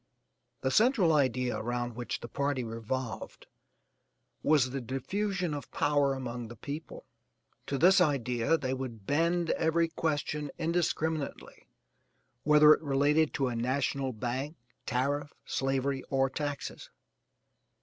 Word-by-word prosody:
The 130 - 0
central 215 - +4
idea 125 -4 +1
around 120 0 -3
which 120 0 -4
the - - -6
party 140 +1 -1
revolved 115 +2 -5 1.0
was 140 -5 +3
the 135 0 -3
diffusion 180 - -2
of 145 - -6
power 145 -2 +2
among 120 -2 -5
the 120 - -10
people. 145 +8 -7 0.6
To 140 - -1
this 185 +5 +6
idea 130 -2 +2
they 130 -4 -2
would 125 -6 -6
bend 170 - +1
every 165 +1 +2
question 150 -2 -2
indiscriminately, 160 -2 -2 0.7
whether 150 0 +7
it - - -1
related 145 +2 +2
to 135 -2 +1
a 120 - -3
national 130 +2 0
bank, 130 +6 -3 0.3
tariff, 145 +3 -1
slavery, 135 0 -1
or 135 -1 +2
taxes. 145 0 -4
140 Hz, 120 wpm, -30 LUFS, 125-155 Hz, 1.0 s, whether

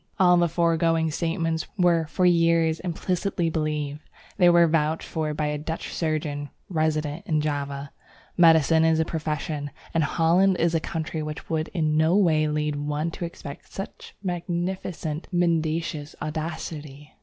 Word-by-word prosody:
All 180 -2 +6
the 175 -1 +3
foregoing 165 -1 +2
statements 165 0 -1
were 170 -3 +3
for 180 +4 0
years 165 -2 +3
implicitly 180 0 -1
believed. 150 -2 -2 0.4
They 180 -3 +6
were 170 0 +6
vouched 160 -1 0
for 155 -2 -2
by 150 - -1
a 150 0 -1
Dutch 160 +2 -5
surgeon 150 -3 -2 0.2
resident 155 -1 -1
in 155 -4 +2
Java. 140 -2 -3 0.4
Medicine 160 -2 +5
is 160 0 +3
a 160 - +2
profession, 150 -2 -3 0.2
and 165 -2 +2
Holland 175 +5 +3
is 170 0 +2
a 165 - +3
country 160 0 -4
which 150 +1 -6
would 160 0 0
in 155 -4 0
no 160 +4 +4
way 160 -6 +3
lead 150 -1 -1
one 150 +3 -2
to 170 - -5
expect 145 -4 -9
such 195 - -8
magnificent 175 -2 -3
mendacious 165 -3 0
audacity! 155 -2 -5
160 Hz, 145 wpm, -25 LUFS, 150-170 Hz, 0.4 s, All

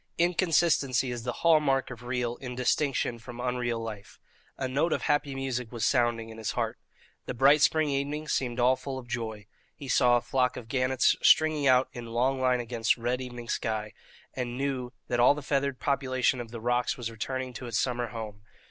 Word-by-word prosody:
Inconsistency 165 -7 +2
is 120 -1 -4
the 125 - -1
hall 165 -2 +7
mark 135 -3 0
of 125 -1 -9
real 120 -1 -2
in 125 -2 -7
distinction 125 -1 0
from 120 +1 -10
unreal 125 -1 -1
life. 110 -3 -8 0.4
A 130 - -2
note 145 +6 +1
of - - -2
happy 145 -2 0
music 125 -3 -3
was 120 -2 -2
sounding 120 -3 +1
in 110 0 -10
his 110 - -3
heart. - - -2 0.5
The - - -4
bright 140 +4 +5
spring 155 +1 +3
evening 145 +2 -2
seemed 125 -4 -1
all 125 +2 +4
full 130 +1 -6
of 125 -2 -9
joy. 110 -3 -4 0.3
He 140 - -9
saw 120 -1 +4
a - - -1
flock 125 +1 0
of 115 - -8
gannets 130 0 +2
stringing 155 -2 +4
out 130 0 +5
in 120 -1 -7
long 130 +3 0
line 125 -1 +2
against 115 -1 0
the 115 - -15
red 125 +2 0
evening 120 -2 -7
sky, 110 -3 -2 0.4
and 125 -1 -4
knew 130 -3 -2 0.2
that 120 - -1
all 125 +4 +6
the 150 - -7
feathered 140 -1 -1
population 130 -2 0
of 115 - -8
the 115 0 -7
rocks 120 +2 0
was 115 -2 -4
returning 130 +3 -4
to 125 +1 -7
its 115 -2 -1
summer 120 -2 0
home. 110 -3 -7
125 Hz, 200 wpm, -28 LUFS, 120-135 Hz, 0.5 s, hall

